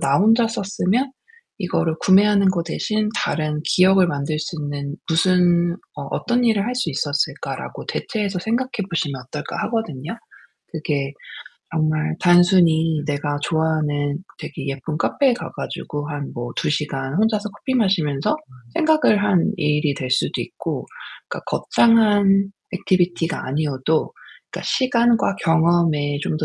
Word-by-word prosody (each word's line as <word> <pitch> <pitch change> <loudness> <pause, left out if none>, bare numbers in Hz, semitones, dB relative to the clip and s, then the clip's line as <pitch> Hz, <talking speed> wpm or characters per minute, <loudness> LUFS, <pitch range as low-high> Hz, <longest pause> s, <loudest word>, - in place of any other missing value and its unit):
'나 140 +1 +2
혼자 225 +4 +4
썼으면 220 +4 -1 0.5
이거를 175 -4 0
구매하는 200 +1 +5
거 180 -2 +1
대신 215 +5 -1
다른 150 -1 -1
기억을 185 0 +4
만들 145 -1 -2
수 165 +2 -5
있는 145 0 -4 0.4
무슨 175 -1 +3 0.2
어 145 - -5
어떤 245 +1 0
일을 220 -4 +2
할 250 - -2
수 250 -9 -1
있었을까'라고 145 0 -3
대체해서 205 -4 -2
생각해 240 +6 -1 0.2
보시면 150 -6 -2
어떨까 170 - -6
하거든요. 200 - -3 0.6
그게 145 -4 -2 0.6
정말 155 0 0
단순히 175 -3 +4
내가 145 0 -2
좋아하는 150 -2 0 0.2
되게 140 -3 -7
예쁜 140 +3 -4
카페에 265 +7 +2
가 - - -7
가지고 145 0 -5
한 145 -1 -5
뭐 120 0 -5
2 - - 0
시간 140 -3 -2
혼자서 215 +2 +1
커피 260 +6 -4
마시면서 175 - +1 0.4
생각을 310 -10 +3
하는 200 -1 +2
일이 150 -3 +1
될 130 -2 -5
수도 - - +1
있고 - - -5 0.4
그러니까 - - -5
'거창한 205 -4 +3 0.2
액티비티가 175 -2 0
아니어도 145 +2 -1 0.4
그러니까 - - -6
시간과 235 -5 +2
경험에 165 -3 +2
좀 155 - -1
더 155 - -1
170 Hz, 305 characters per minute, -21 LUFS, 150-205 Hz, 0.6 s, 구매하는